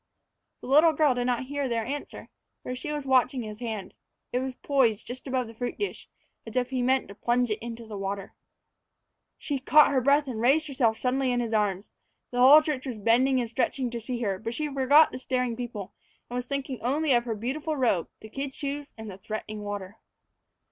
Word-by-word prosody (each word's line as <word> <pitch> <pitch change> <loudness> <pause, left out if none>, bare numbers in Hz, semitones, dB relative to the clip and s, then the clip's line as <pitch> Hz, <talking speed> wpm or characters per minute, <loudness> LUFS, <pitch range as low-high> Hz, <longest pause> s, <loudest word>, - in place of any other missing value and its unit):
The - - -9
little 310 +5 +6
girl 300 -2 +3
did 245 0 -2
not 250 0 0
hear 285 0 -2
their 230 -2 -1
answer, 285 +4 -6 0.3
for 250 - -4
she 260 +4 -5
was 295 -2 -4
watching 255 -1 +2
his 215 -1 -8
hand. 220 -5 -5 0.4
It 250 - +2
was 260 0 -4
poised 245 -7 +1
just 255 +3 -8
above 255 -1 0
the 225 - -11
fruit 245 +2 -4
dish, 410 - -4 0.3
as 225 - -10
if 250 0 0
he 255 -1 0
meant 260 +1 +2
to - - -8
plunge 240 +2 0
it 210 - -1
into 235 0 -7
the 210 -2 -7
water. 195 0 -4 1.0
She 285 -3 -3
caught 300 +3 +6
her 265 -2 +2
breath 285 +3 +4
and 230 -4 -4
raised 290 +6 +3
herself 245 -6 +1
suddenly 260 +1 0
in 245 - +1
his 230 -2 -2
arms. 205 -2 0 0.4
The 245 - -2
whole 285 +5 +9
church 290 -3 -3
was 245 -4 -4
bending 250 +5 +3
and 240 - -1
stretching 250 +2 -1
to 235 -1 -5
see 240 +1 -4
her, 195 -4 -1
but 230 +2 -5
she 300 0 -3
forgot 280 +3 +5
the 255 - -6
staring 250 -2 -1
people, 225 -5 -6 0.4
and - - -4
was 250 0 -3
thinking 275 -2 -4
only 280 +4 +1
of 240 0 +2
her 230 -2 -2
beautiful 285 +8 -3
robe, 230 -10 +1
the 220 - -10
kid 270 +3 -5
shoes, 285 0 -4
and 220 0 -8
the 190 - -11
threatening 215 +1 -6
water. 205 0 -6
250 Hz, 215 wpm, -27 LUFS, 225-275 Hz, 1.0 s, whole